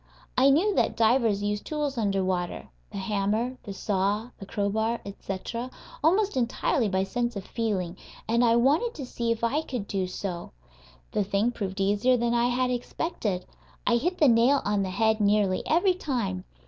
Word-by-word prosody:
I 265 +2 +5
knew 355 +10 +3
that - - +1
divers 225 -3 +3
use 205 0 -1
tools 295 -3 -2
under 200 -4 0
water 180 -2 -2 0.2
the - - -6
hammer, 210 +5 -1
the 205 - -8
saw, 200 +4 -1
the 195 - -9
crowbar, 220 +4 0
etc. 200 +5 -5 0.3
almost 385 +4 +3
entirely 240 -2 +1
by 190 0 +1
sense 240 +4 -2
of 195 - -5
feeling, 195 -7 -2 0.3
and 235 +2 +3
I 230 -1 +4
wanted 295 - +2
to 280 - -5
see 235 -2 -2
if 230 0 -2
I 275 +7 +2
could 250 -9 -5
do 190 -2 -1
so. 180 -1 -5 0.6
The 210 - +1
thing 200 +4 +1
proved 200 -4 -5
easier 205 +6 +3
than 235 0 0
I 240 0 +3
had 250 +1 +1
expected. 235 - -3 0.4
I 235 - +4
hit 355 +9 -1
the 300 - +5
nail 245 +4 +4
on 205 -1 +1
the 190 - -1
head 220 +3 +1
nearly 205 -2 +2
every 355 +4 +3
time. 230 - -3
225 Hz, 175 wpm, -27 LUFS, 200-250 Hz, 0.6 s, I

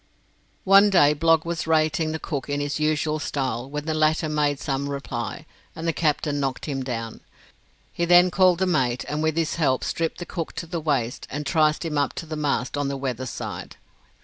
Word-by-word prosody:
One 195 +2 +6
day 150 -7 +5
Blogg 165 +1 +3
was 170 -1 -3
rating 155 0 +2
the 160 - -2
cook 145 -3 -5
in 145 0 -1
his 145 +1 -2
usual 155 0 0
style 130 -4 -3
when 150 +1 -5
the 160 - -1
latter 155 +1 +2
made 150 -2 0
some 140 -1 -2
reply, 120 -6 -5 0.3
and 160 +1 -5
the 165 - +1
captain 150 -2 0
knocked 135 -2 -2
him 135 -3 -3
down. 115 -3 -5 0.7
He 170 - 0
then 175 +1 +6
called 185 -1 +4
the 190 - +1
mate, 130 -9 0
and 150 +1 -2
with 160 0 0
his 165 0 0
help 135 -6 +1
stripped 165 -1 -2
the 175 - -6
cook 165 -2 -5
to - - -5
the 170 0 -4
waist 135 -6 -1
and 145 +2 -4
triced 155 +2 +2
him 150 -3 -1
up 140 - 0
to 165 - -6
the 155 0 -5
mast 145 -2 -1
on 145 - 0
the 140 0 -2
weather 130 -2 -3
side. - - -6
150 Hz, 205 wpm, -24 LUFS, 140-165 Hz, 0.7 s, One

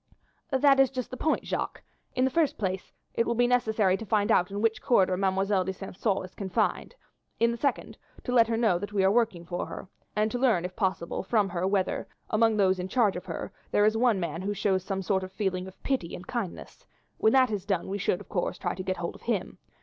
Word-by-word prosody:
"That 275 -1 +4
is 270 -1 +6
just 255 -2 -5
the - - -4
point, 310 +5 0
Jacques. - - -3 0.3
In 255 - +3
the 260 - +1
first 320 0 +1
place 190 -2 -3 0.2
it 230 - +1
will 235 - +1
be 245 +1 +3
necessary 220 -6 +2
to 225 - -7
find 205 0 +2
out 180 - +3
in 200 +1 -4
which 225 +1 +1
corridor 190 -6 +3
Mademoiselle 195 0 +1
de 190 - -2
St. 190 0 -9
Caux 200 -5 +1
is 185 - -13
confined; 195 - -1 0.4
in 235 0 +4
the 235 - -4
second, 275 +1 -2 0.2
to 250 - -3
let 235 -2 +5
her 230 -1 0
know 220 -7 +2
that 205 +2 -6
we 195 -2 +2
are 190 - +5
working 215 -7 +1
for 175 +1 -3
her, - - -8 0.3
and 215 +1 +1
to 245 - -2
learn, 225 -10 +3
if 180 0 -6
possible, 185 -4 -1
from 205 -1 +1
her 180 +1 -1
whether, 195 -1 0 0.2
among 225 0 +3
those 190 -2 +3
in 180 - -3
charge 215 -1 +2
of 180 +1 -6
her, - - -5 0.2
there 205 - +3
is 215 +1 +3
one 230 -3 +3
man 170 -1 -3
who 205 +2 -2
shows 190 -2 +1
some 195 0 -3
sort 190 0 0
of 185 - -7
feeling 190 -2 -2
of 190 - -14
pity 260 -11 -1
and 180 - -9
kindness; 225 -6 -6 0.3
when 220 - +4
that 260 -3 +5
is 205 -3 -2
done 195 -4 -1
we 200 +1 -3
should, 185 - 0
of 200 - -13
course, 175 - -2
try 175 - -2
to 185 - -6
get 185 0 -2
hold 170 - -3
of - - -15
him. 225 -6 -2
200 Hz, 245 wpm, -28 LUFS, 185-230 Hz, 0.4 s, is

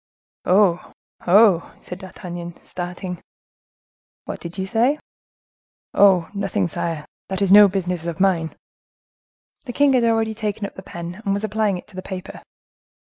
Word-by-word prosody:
"Oh! 185 -2 +3 0.3
oh!" 190 -2 +5
said 180 - -8
D'Artagnan, 175 -2 -8
starting. 180 0 -6 1.0
"What - - -6
did 170 +2 -8
you 190 - -2
say?" 235 +8 +2 1.0
"Oh! 190 -4 +5
nothing, 200 -3 -1
sire. 165 -2 -4 0.2
This 190 +1 -1
is 190 - +2
no 205 0 +10
business 180 -3 -2
of 170 +1 -4
mine." 175 -4 +1 1.1
The 245 - -6
king 285 +1 +4
had 250 -2 +3
already 225 -1 +2
taken 215 -1 -3
up - - -7
the - - -9
pen, 175 +1 -8
and 195 -2 0
was 200 - -4
applying 215 -2 0
it - - -10
to 200 - -16
the 185 - -5
paper. 185 -1 -8
190 Hz, 150 wpm, -22 LUFS, 175-210 Hz, 1.1 s, no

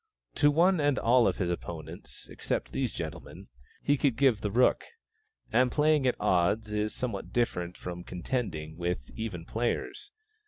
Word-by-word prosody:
To 145 - +4
one 170 +4 +4
and 145 -2 +2
all 120 0 +4
of - - 0
his 90 -4 0
opponents, 85 -1 -7
except - - -3
these - - -1
gentlemen, - - -7 0.3
he 145 0 +3
could 135 -3 +2
give 125 -5 +3
the 105 - -1
rook; 120 +5 +3 0.7
and 125 +2 +4
playing 150 -2 +3
at 125 - 0
odds 100 +5 +2
is 105 0 0
somewhat 115 -6 -4
different 90 -7 -1
from 90 0 -6
contending 90 - -3
with 85 -9 -3
even 100 -7 -5
players. 120 - -2
110 Hz, 155 wpm, -29 LUFS, 90-130 Hz, 0.7 s, To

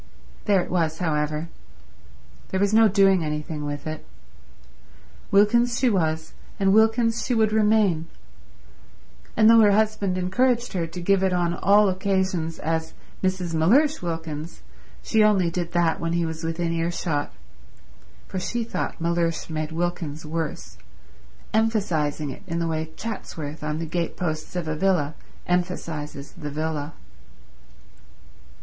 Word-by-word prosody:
There 200 -3 +4
it - - -9
was, 165 -3 0
however. 155 -1 -1 1.0
There 190 - -1
was 200 +1 +2
no 225 0 +7
doing 195 -3 +4
anything 150 0 -4
with 145 0 -5
it. 155 0 -5 1.3
Wilkins 235 +4 +4
she 255 -3 +3
was 160 -4 -1 0.3
and 195 -1 +3
Wilkins 225 +1 +3
she 245 - 0
would 220 -1 +3
remain; 210 -6 +2 1.3
and 215 0 +6
though 230 0 +8
her 210 -2 +6
husband 210 -3 +1
encouraged 240 +6 +1
her 170 -3 -1
to 165 +2 -8
give 195 +2 +3
it 190 -1 +2
on 175 -1 +1
all 205 +3 +4
occasions 185 -3 0
as 160 +1 -2 0.3
Mrs. 185 -2 -1
Mellersh 260 - +3
Wilkins 165 -2 -5 0.4
she 220 -2 +3
only 195 -5 +3
did 175 -1 -3
that 170 -2 +2
when 165 0 -2
he 170 0 +1
was 160 0 -5
within 165 +1 -1
earshot, 165 -3 -1 1.0
for 190 - -4
she 235 +6 -2
thought 225 - -4
Mellersh 170 -1 -1
made 155 0 -3
Wilkins 160 -2 -3
worse, 160 0 -4 0.7
emphasizing 175 -10 0
it - - -10
in 165 -1 -2
the 170 -1 0
way 160 -1 -2
Chatsworth 160 -9 -6
on 150 0 -2
the 165 - -3
gate 170 +1 -3
posts 155 -1 -3
of 175 -3 -2
a 155 - -1
villa 160 -4 +1 0.3
emphasizes 165 -5 -3
the 150 - -7
villa. 150 0 -3
175 Hz, 140 wpm, -24 LUFS, 160-200 Hz, 1.3 s, though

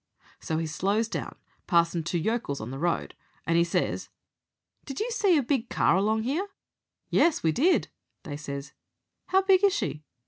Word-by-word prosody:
So 160 - -2
he 165 - -1
slows 200 +8 0
down - - -5 0.3
passin' 170 -1 +3
two 170 +2 -2
yokels 195 - -1
on 110 +3 -6
the 135 - -6
road, 170 +2 -1 0.3
and 165 - +1
he 170 - +5
says, 170 - -1 0.8
'Did 275 -2 -6
you 465 +3 -1
see 400 -7 +3
a 285 - +2
big 250 -2 -1
car 160 - +3
along 220 +4 +1
'ere?' 335 +10 -1 0.6
"'Yes, 335 - +3
we 160 - +3
did,' 325 - +3 0.4
they 145 - -6
says. 140 -1 -6 0.5
"'How 385 +1 +3
big 385 0 +4
is 400 -1 +5
she?' 150 - -3
200 Hz, 175 wpm, -27 LUFS, -, 0.8 s, he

